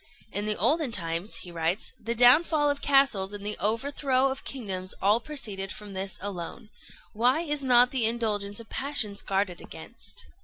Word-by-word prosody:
"In 205 +1 -3
the 210 - 0
olden 275 - +1
times," 170 -1 0
he 175 - -9
writes, 170 +3 -2
"the 230 +2 -3
downfall 290 +5 +5
of 285 - -5
castles 270 -9 +3
and 205 0 -7
the 210 - -2
overthrow 260 +4 +1
of 270 - -6
kingdoms 190 -8 -5
all 205 +4 +3
proceeded 210 -10 -3
from 205 -2 -9
this 190 0 -4
alone. 195 +1 -7 0.4
Why 245 +8 +2
is 295 -4 -2
not 245 -1 +5
the 245 -5 +2
indulgence 210 -3 -1
of 230 - -11
passions 235 -8 0
guarded 195 -3 -1
against?" - - -8
220 Hz, 165 wpm, -27 LUFS, 195-265 Hz, 0.4 s, downfall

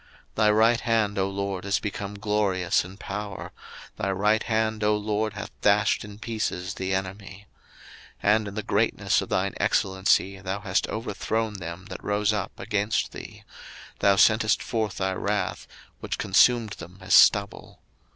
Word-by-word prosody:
02:015:006 - - -37
Thy 105 -1 +4
right 110 +2 +4
hand, 110 -4 +1
O 95 0 +1
LORD, 100 -1 -3
is 100 0 0
become 100 -1 -5
glorious 100 -2 +1
in 95 +2 -11
power: 100 0 -6 0.5
thy 100 - -2
right 105 +3 +2
hand, 110 -1 -1
O 105 0 +3
LORD, 105 +1 -1
hath 100 -1 -7
dashed 105 0 +3
in 105 -1 -10
pieces 105 -4 -3
the 95 0 -4
enemy. 95 +1 -4 0.8
02:015:007 105 - +5
And 110 -1 -1
in 100 - -7
the 110 - -3
greatness - - +1
of - - -7
thine - - 0
excellency 95 0 +1
thou 95 +1 -4
hast 95 -2 0
overthrown 110 -1 -2
them 85 +1 -7
that - - -7
rose 105 +1 +1
up 105 +1 -4
against 105 -2 -1
thee: - - -10 0.6
thou 100 -1 +4
sentest 110 +2 +4
forth 110 -4 -2
thy 95 0 -1
wrath, 100 +2 -2 0.3
which - - -4
consumed 120 -4 +3
them 85 +2 -10
as 95 +1 -1
stubble. 100 -1 +4
105 Hz, 160 wpm, -26 LUFS, 95-110 Hz, 0.8 s, 02:015:007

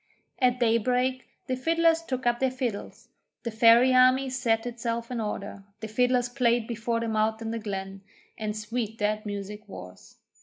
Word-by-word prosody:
At 250 -2 +2
daybreak 250 +2 +1 0.2
the 255 - -1
fiddlers 330 +4 +2
took 260 -6 -4
up 240 0 +2
their 265 - +2
fiddles, 250 -5 -5 0.3
the 235 - -3
Fairy 230 +3 +6
army 255 +1 +4
set 235 -3 0
itself 235 0 -4
in 240 -2 -2
order, 200 -1 -5 0.2
the 220 - -5
fiddlers 245 +2 +2
played 240 -2 +1
before 230 0 -2
them 230 -1 -2
out 220 +1 +1
of 225 -1 -4
the 230 - -3
glen, 195 -2 -5 0.3
and 215 -1 -4
sweet 220 0 -4
that 210 0 -1
music 205 +1 -6
was. 90 - -11
230 Hz, 165 wpm, -27 LUFS, 215-250 Hz, 0.3 s, Fairy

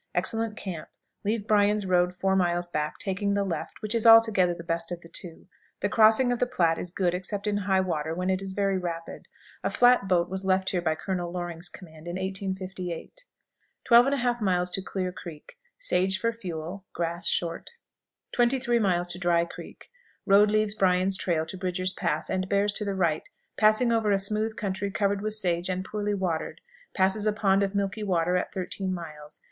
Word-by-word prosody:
Excellent 220 +4 -1
camp. 175 -5 -6 0.3
Leave 210 0 -1
Bryan's 210 -1 +2
road 180 -1 +2
four 190 +1 +1
miles 175 -1 +1
back, 150 -3 -3
taking 200 +1 -1
the 200 - +1
left, 175 0 -5
which 215 - -1
is 230 0 +2
altogether 220 -5 +6
the 170 - -9
best 170 0 -2
of 175 -1 -5
the 165 - -13
two. 165 -1 -7 0.4
The 205 - 0
crossing 225 +4 +5
of 245 - -1
the 250 - +1
Platte 170 -10 +1
is 180 - -2
good 180 0 0
except 195 +3 -2
in 205 -1 0
high 190 -1 +1
water, 160 -3 -2
when 180 +2 -1
it 185 0 -1
is 195 -1 -5
very 195 -1 0
rapid. 170 -2 -6 0.4
A - - +1
flat 245 -5 +4
boat 175 -2 +2
was 190 +1 -4
left 190 0 +2
here 180 - 0
by 160 -2 0
Colonel 175 0 -3
Loring's 175 -1 -2
command 160 -3 -13
in 175 - -4
1858. 190 - -5 0.6
12 240 0 +7
1/2. 210 -9 +1
Clear 185 -1 -3
Creek. 170 - -11 0.2
Sage 190 - +1
for 230 - +1
fuel; 180 -2 -6
grass 170 +2 0
short. 170 -1 -1 0.6
23. 240 0 +2 0.4
Dry 170 -1 +2
Creek. - - -12 0.3
Road 205 +1 +5
leaves 215 0 +1
Bryan's 190 -1 +2
trail 165 -4 0
to 190 - -7
Bridger's 185 0 -1
Pass, - - -2
and 185 0 -2
bears 200 +1 +2
to 210 - -2
the 200 -1 -2
right, 165 -5 0 0.3
passing 215 +3 +3
over 225 -2 +1
a 200 - +4
smooth 215 +3 -1
country 200 -2 -3
covered 200 0 0
with 215 0 -2
sage 180 -4 -1
and 185 0 -2
poorly 210 0 -2
watered; 175 -5 -3 0.4
passes 195 +3 +2
a - - +4
pond 200 -2 +2
of 200 0 -1
milky 200 +1 -1
water 180 -3 +1
at 180 - -1
thirteen 190 +1 -3
miles. 155 -4 -7
190 Hz, 185 wpm, -27 LUFS, 175-210 Hz, 0.6 s, 12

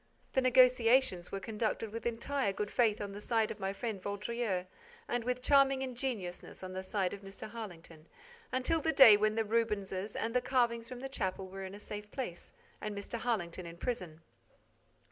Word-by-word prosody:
The 265 - +3
negotiations 250 -6 +4
were 195 - -3
conducted 220 +1 -2
with 230 +2 -3
entire 235 0 0
good 205 +1 -3
faith 220 -4 +3
on 205 -1 -4
the 205 +1 -7
side 225 -1 +1
of 215 - -7
my 195 0 -1
friend 205 -1 -4
Vaudreix 205 -1 -2 0.4
and 245 -1 -1
with 250 +1 -2
charming 275 -1 +5
ingenuousness 240 -10 -4
on 185 0 -6
the 185 - -3
side 190 -1 -1
of 200 - -7
Mr. 195 +1 -8
Harlington, 170 -8 -9 0.4
until 285 +6 +1
the 320 +1 +1
day 235 -6 +10
when 215 +1 +2
the 225 -1 +1
Rubenses 210 -3 -1
and 225 0 -2
the 250 - +4
carvings 235 -3 +1
from 250 -1 -7
the 270 - -3
chapel 190 -7 -2
were 195 0 -6
in 190 +1 -7
a - - -10
safe 210 0 -7
place 210 -8 -6 0.3
and 210 -1 -4
Mr. 200 +3 -4
Harlington 185 -7 -2
in 170 0 -9
prison. 180 -7 -4
215 Hz, 185 wpm, -33 LUFS, 195-245 Hz, 0.4 s, day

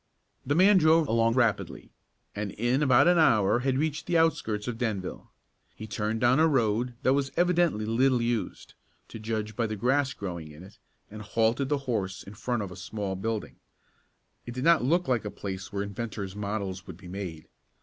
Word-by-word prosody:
The 145 +3 0
man 190 +3 +6
drove 160 -1 +4
along 115 0 +2
rapidly, 120 -5 0 0.4
and 105 -1 -4
in 120 +5 0
about 135 +1 +5
an 175 -1 +5
hour 110 -7 +4
had 130 +1 0
reached 155 +1 -2
the 175 -1 +2
outskirts 115 -10 +1
of 120 -2 -4
Denville. 105 -7 -3 0.5
He 110 - -8
turned 105 +2 -2
down 125 +4 +4
a 160 - +5
road 120 -3 +1
that 130 - +4
was 140 -1 0
evidently 175 -10 +2
little 125 +3 +2
used, 115 -1 -3 0.4
to 115 - -8
judge 110 -1 -3
by 115 0 0
the 110 - -4
grass 130 +5 +1
growing 85 -7 -6
in 75 +3 -12
it, 100 +2 -15 0.3
and 105 0 -8
halted 115 +5 0
the 145 - +2
horse 95 -7 -2
in 100 - -11
front 120 +1 -2
of 95 - -7
a - - -8
small 100 -3 -4
building. 110 +2 -4 0.9
It 120 - -6
did 130 - -3
not 165 -3 +5
look 170 +7 +1
like 125 -3 +1
a 105 - -4
place 95 -1 -6
where 100 -1 -2
inventors' 100 -2 -5
models 100 -3 -4
would 90 - -9
be 90 -1 -13
made. 90 -4 -7
115 Hz, 190 wpm, -28 LUFS, 100-135 Hz, 0.9 s, man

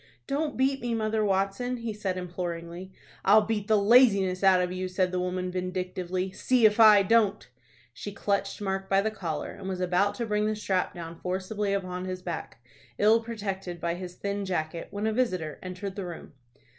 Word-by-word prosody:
"Don't 290 +1 -2
beat 270 +1 +1
me, 240 -1 -1
Mother 220 -1 0
Watson," 200 +5 0
he 230 -2 -4
said, 195 -3 -3
imploringly. 175 0 -5 0.3
"I'll 210 +2 +6
beat 210 -1 -2
the 220 - +4
laziness 200 -4 +5
out 190 -1 +6
of 180 0 0
you," 185 0 -3
said 185 0 0
the 185 - -1
woman, 180 0 -2
vindictively. 185 0 -3
"See 245 +4 +2
if 210 +1 +4
I 210 -3 +8
don't." 210 - +2 0.5
She 205 - -7
clutched 200 +1 -2
Mark 195 -1 -2
by 195 - +4
the 220 - 0
collar, 170 -8 -4
and 190 -1 -7
was 185 -1 -3
about 185 +3 +1
to 235 - -2
bring 210 -1 0
the 215 - 0
strap 190 -2 -1
down 165 -1 -8
forcibly 195 +3 -2
upon 185 -2 -2
his 185 -1 -5
back, 165 -8 -6 0.3
ill 220 +2 +5
protected 195 -6 -5
by 170 0 -1
his 180 0 -7
thin 200 +1 -3
jacket, 165 -3 -3
when 205 +1 -4
a 220 - +1
visitor 185 - -1
entered 185 +1 -6
the 195 -3 -4
room. 170 -3 -9
195 Hz, 190 wpm, -28 LUFS, 180-215 Hz, 0.5 s, I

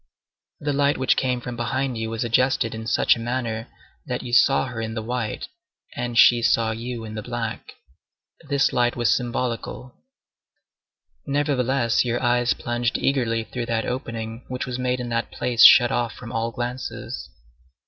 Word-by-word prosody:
The 145 0 -1
light 140 +1 +2
which 130 -1 +2
came 125 -2 0
from 120 0 -6
behind 130 +2 -2
you 110 0 -3
was 115 +2 -2
adjusted 125 0 +1
in 110 0 -6
such - - +3
a - - -8
manner 115 -1 -3 0.4
that 125 -1 -3
you 120 -1 -7
saw 135 +3 +5
her 120 -3 -5
in 110 0 -4
the 110 - -3
white, 120 -2 -3 0.5
and 120 -1 -3
she 120 +1 +7
saw 115 -1 +2
you 115 +1 -5
in 110 - -8
the 110 - -4
black. 115 -1 -5 0.8
This 140 -2 +2
light 120 -1 +2
was 120 -1 +2
symbolical. 125 0 -2 1.3
Nevertheless, 135 -4 +1
your 120 -1 -1
eyes 120 -1 +2
plunged 120 0 -1
eagerly 115 -5 0
through 120 +1 -5
that 115 -1 -1
opening 115 -2 -5
which 125 0 -4
was 125 0 -4
made 125 0 0
in 125 -1 -4
that 115 0 -1
place 120 -2 +2
shut 120 -1 +9
off 120 -1 -1
from 120 -1 -10
all 115 -1 -1
glances. 120 +2 -5
120 Hz, 170 wpm, -23 LUFS, 115-125 Hz, 1.3 s, shut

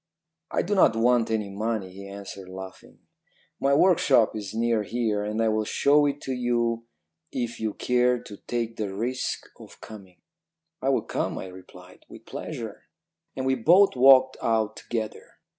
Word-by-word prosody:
"'I - - 0
do 205 - -2
not 185 - +4
want 120 0 +3
any 105 -3 -1
money,' 105 -2 -3
he 100 +1 -10
answered 100 -1 -9
laughing. 95 0 -11 0.6
'My 140 +1 +3
workshop 145 - +4
is 100 -3 -5
near 115 0 +1
here, 110 -1 -1
and 105 +1 -3
I 115 -1 +2
will 110 0 +1
show 145 +6 +3
it 140 0 -2
to 135 - -5
you 120 -2 -1 0.4
if 120 -2 -4
you 110 -2 -2
care 125 0 +2
to 105 -3 -11
take 115 -1 -2
the 105 -3 -3
risk 120 +6 -3
of - - -14
coming.' 95 -4 -13 0.6
"'I 135 - 0
will 135 - +1
come,' - - -3
I - - -5
replied, 90 0 -15
'with - - -13
pleasure.' - - -7 0.5
"And 130 - -3
we 130 - +2
both 170 - +5
walked 130 0 +6
out 110 -1 0
together. 110 -2 -5
115 Hz, 165 wpm, -26 LUFS, 105-125 Hz, 0.6 s, walked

